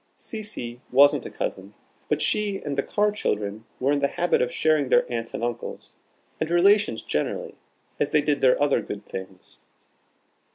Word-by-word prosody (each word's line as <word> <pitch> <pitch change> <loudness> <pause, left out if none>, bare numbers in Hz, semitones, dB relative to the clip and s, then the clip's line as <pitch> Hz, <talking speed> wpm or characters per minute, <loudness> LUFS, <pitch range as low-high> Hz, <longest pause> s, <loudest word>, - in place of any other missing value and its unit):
Cecy 205 - -7
wasn't 140 +3 +5
a - - -7
cousin, 100 +2 -5 0.3
but - - +1
she 205 -2 +1
and 145 -2 -4
the 140 - +1
Carr 210 +7 +1
children 105 - -2
were 135 +2 +2
in 145 - +2
the 140 - +2
habit 175 +4 +1
of 125 0 0
sharing 155 -4 +2
their - - +4
aunts 115 -1 -3
and - - -4
uncles, 120 -1 -5 0.4
and 160 - -1
relations 195 - +3
generally, - - -2 0.5
as 145 - +1
they 150 -1 +2
did 145 -2 0
their 130 -1 +4
other 145 -1 +2
good 105 0 -7
things. 95 -1 -9
140 Hz, 170 wpm, -25 LUFS, 115-175 Hz, 0.5 s, wasn't